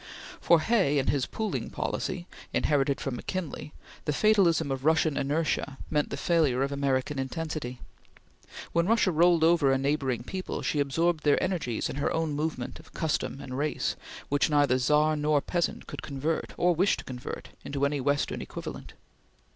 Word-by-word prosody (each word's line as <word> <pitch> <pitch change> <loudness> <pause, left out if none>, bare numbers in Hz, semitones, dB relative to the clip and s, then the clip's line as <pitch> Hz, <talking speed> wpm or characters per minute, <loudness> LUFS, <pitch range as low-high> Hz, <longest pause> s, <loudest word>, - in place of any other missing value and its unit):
For 170 -2 +4
Hay 190 -9 +2
and 135 - +1
his 140 -3 0
pooling 220 -2 -3
policy, 185 -2 -3 0.3
inherited 140 -2 +2
from 130 -3 -3
McKinley, 170 -1 -5 0.3
the 150 - +1
fatalism 170 -5 +3
of 135 -1 -3
Russian 160 -1 +3
inertia 145 -1 -1
meant 150 -1 +1
the - - -4
failure 150 -7 +2
of 140 - -1
American 140 0 0
intensity. 135 -3 -4 0.9
When 170 +1 +2
Russia 220 -4 +3
rolled 170 0 +4
over 165 -4 +4
a 135 - +3
neighboring 135 -3 0
people, 185 +8 -4
she 150 - 0
absorbed 160 +3 +1
their 145 -1 +4
energies 170 - -1
in - - -5
her 145 - 0
own 160 -2 0
movement 150 -4 -3
of 160 - -17
custom 155 -3 -1
and 130 - -6
race 150 0 -1 0.3
which 145 +2 +2
neither 145 -4 +3
Czar 150 +4 +3
nor 150 0 +2
peasant 175 +4 -2
could - - -7
convert, 145 +3 -3
or 180 0 +3
wished 185 +4 +2
to - - -9
convert, 125 -1 -7
into 140 0 -1
any 140 -1 0
Western 145 +2 0
equivalent. - - -7
150 Hz, 165 wpm, -28 LUFS, 140-165 Hz, 0.9 s, For